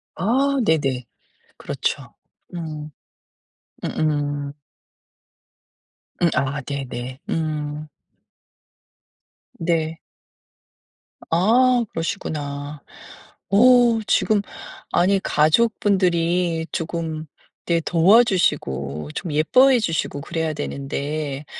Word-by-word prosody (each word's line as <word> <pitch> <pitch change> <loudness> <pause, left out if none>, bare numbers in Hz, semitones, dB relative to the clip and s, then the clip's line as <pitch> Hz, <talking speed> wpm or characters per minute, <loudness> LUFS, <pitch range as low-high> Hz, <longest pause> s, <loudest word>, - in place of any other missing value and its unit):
아 265 - +1
네네. 135 - +1 0.5
그렇죠. - - -3 0.4
음. 155 -3 -6 0.9
으음. 145 -2 -1 1.7
음 170 - +4
아 140 +2 -1
네네. 130 -2 -6
음. 155 -3 -3 1.7
네. 165 -1 -1 1.3
아 240 +8 +4
그러시구나. 145 -4 -4 0.7
어 200 - +3 0.5
지금 210 -2 +2 0.5
아니 195 +3 +3
가족분들이 175 -2 +2
조금 160 -1 -3 0.4
이렇게 170 -1 +2
도와주시고 165 - +2
좀 170 - -4
예뻐해 250 - +5
주시고 165 -7 -2
그래야 160 +1 -2
되는데 145 +1 -4
160 Hz, 150 characters per minute, -22 LUFS, 145-180 Hz, 1.7 s, 예뻐해